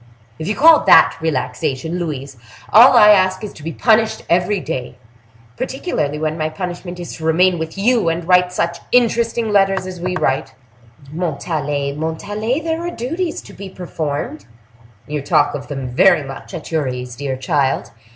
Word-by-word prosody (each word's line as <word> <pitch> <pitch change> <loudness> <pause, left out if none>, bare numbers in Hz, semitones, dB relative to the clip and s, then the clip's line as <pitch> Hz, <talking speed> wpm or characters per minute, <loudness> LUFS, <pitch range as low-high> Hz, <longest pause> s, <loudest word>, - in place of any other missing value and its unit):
If 160 - -5
you 210 - -1
call 320 +1 +6
that - - +6
relaxation, 160 0 -2
Louise, 140 -5 -5 0.4
all 245 +4 +8
I 210 -2 +8
ask 185 0 +3
is 210 - -6
to - - -14
be 165 +2 -5
punished 220 +3 +2
every 180 +4 +2
day; 130 -8 -5 0.6
particularly 155 - -3
when 155 +1 -3
my 155 0 -1
punishment 175 +2 -6
is 175 - -7
to 160 - -10
remain 175 +2 +3
with 160 +3 -5
you 225 -2 +2
and 165 0 -3
write 180 0 +4
such 170 -1 -2
interesting 235 -2 +1
letters 195 -2 +2
as 185 -2 -8
we 180 +1 -2
write!" 135 -6 -1 0.6
"Montalais! 150 -4 -2
Montalais! 205 - -3
there 325 +1 -2
are 345 - -3
duties 330 +4 -4
to - - -13
be 200 0 -9
performed." 150 - -5 0.6
"You 150 -1 -4
talk 145 +1 +2
of 140 -1 -6
them 135 -3 -5
very 165 +5 +4
much 135 +7 -9
at 165 - -8
your 155 -4 0
ease, 125 -1 -5
dear 135 -1 -4
child! 135 0 -1
170 Hz, 170 wpm, -18 LUFS, 150-205 Hz, 0.6 s, all